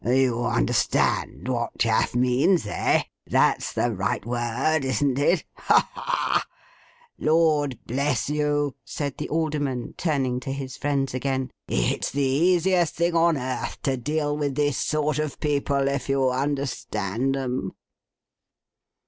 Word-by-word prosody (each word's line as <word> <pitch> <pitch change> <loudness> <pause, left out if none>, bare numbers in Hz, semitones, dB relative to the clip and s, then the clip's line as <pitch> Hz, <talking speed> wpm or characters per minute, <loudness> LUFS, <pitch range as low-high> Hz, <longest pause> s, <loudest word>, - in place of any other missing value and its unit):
You 125 -1 +2
understand - - +1
what 120 -3 -2
"chaff" 115 +1 +1
means, 130 - +3
eh? 105 - +1 0.2
That's - - +2
the 120 - 0
right 100 -1 -2
word, 120 +6 0
isn't 130 +1 +1
it? 155 +3 +2
Ha, - - +3
ha, - - -8
ha! - - 0 0.7
Lord 155 -4 +2
bless 135 0 0
you,' 145 -1 0
said 140 -3 -4
the - - -4
Alderman, 145 -6 -1
turning 135 -7 0
to 135 +1 -5
his 135 -2 -5
friends 140 -3 -1
again, 130 0 -2 0.2
'it's - - 0
the 140 0 -1
easiest 175 +4 +2
thing 170 +1 +1
on 165 -1 +4
earth 130 -1 -4
to 135 - +1
deal 145 +3 -1
with 145 -2 -2
this 145 -2 +1
sort 155 0 0
of 155 -2 -3
people, 140 -2 0
if 140 0 -2
you 135 -1 +2
understand 135 -3 -1
'em. 125 -7 -3
140 Hz, 135 wpm, -25 LUFS, 125-150 Hz, 0.7 s, on